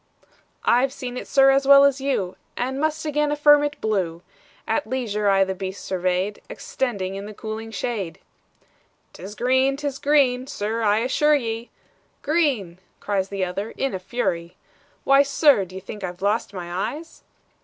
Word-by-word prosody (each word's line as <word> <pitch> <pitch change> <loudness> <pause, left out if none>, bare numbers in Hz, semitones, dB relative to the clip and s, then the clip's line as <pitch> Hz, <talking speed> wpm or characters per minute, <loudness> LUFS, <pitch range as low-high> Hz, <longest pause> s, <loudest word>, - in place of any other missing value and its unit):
"I've 255 +2 +3
seen 250 -2 -6
it, - - -6
sir, 270 0 +5
as 270 0 +2
well 280 0 +9
as 280 -1 +3
you, 205 -10 -1 0.2
And 260 +2 -2
must 315 0 -1
again 300 0 0
affirm 295 0 +5
it 290 0 -3
blue; 185 -6 -2 0.4
At 295 - 0
leisure 215 -5 -1
I 195 0 +4
the 190 0 -2
beast 190 +1 -6
surveyed, 185 +2 -1
Extending 230 - -3
in 200 +1 -6
the 215 - -10
cooling 220 +1 -6
shade." 200 -6 -4 1.0
"'T - - -13
is 200 +3 -8
green, 260 +3 +2
't 295 - -7
is 275 -1 -4
green, 270 -3 +2
sir 225 -3 -3
I 210 0 +2
assure 295 +5 +3
ye!" 230 -3 -3 0.5
"Green!" 275 - 0 0.2
cries 195 -2 -1
the 195 -2 -1
other 195 +5 -5
in 270 - -1
a 190 - -3
fury 180 -5 -3 0.5
"Why, 275 0 +6
sir! 280 - +3
d'ye 185 +1 -9
think 195 +2 -9
I've 180 +1 -6
lost 210 +3 0
my 180 +4 -3
eyes?" 320 +2 -12
230 Hz, 170 wpm, -23 LUFS, 195-275 Hz, 1.0 s, well